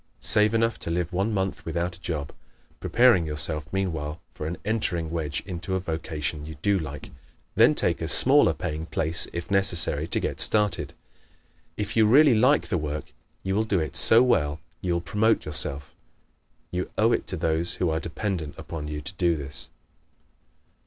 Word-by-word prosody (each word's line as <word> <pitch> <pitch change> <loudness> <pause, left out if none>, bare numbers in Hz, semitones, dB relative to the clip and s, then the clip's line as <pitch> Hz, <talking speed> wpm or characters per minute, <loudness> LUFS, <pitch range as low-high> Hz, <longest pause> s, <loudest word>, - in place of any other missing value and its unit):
Save 105 +1 +4
enough 115 0 +1
to - - -5
live 85 +1 -2
one 95 +5 0
month 95 -2 -2
without 85 +2 -3
a 95 - -17
job, 75 -6 -4 0.5
preparing 120 -9 +3
yourself 75 0 -1
meanwhile 85 -5 -3
for 75 - -6
an 85 +2 -4
entering 90 -7 -1
wedge 75 -4 -3
into 95 0 -4
a - - 0
vocation 80 -3 -4
you 80 +1 -8
do 100 -1 +2
like. 75 -2 -8 0.4
Then - - +5
take - - 0
a - - -2
smaller - - +3
paying 80 +2 -5
place 80 +1 0
if 85 +2 -6
necessary 85 -6 +2
to - - 0
get - - -4
started. 105 -3 +2 0.8
If 105 - -3
you 110 -2 +4
really 140 +4 +6
like 125 +6 +3
the 90 -6 0
work 75 0 -5 0.3
you 95 - -2
will 105 +3 +1
do 100 -4 0
it 80 -4 -4
so 115 +2 +8
well 75 -12 +1 0.2
you 90 -2 -1
will 85 - -1
promote 105 +7 +1
yourself. 70 -2 -2 0.8
You 90 0 -3
owe 115 +2 +3
it - - -1
to 95 - -3
those 80 +1 0
who 90 -3 0
are 80 - -1
dependent 85 -3 -4
upon 75 -2 -7
you 75 0 -5
to 80 +5 -6
do 85 -2 +1
this. 70 -1 -6
85 Hz, 180 wpm, -25 LUFS, 80-100 Hz, 0.8 s, so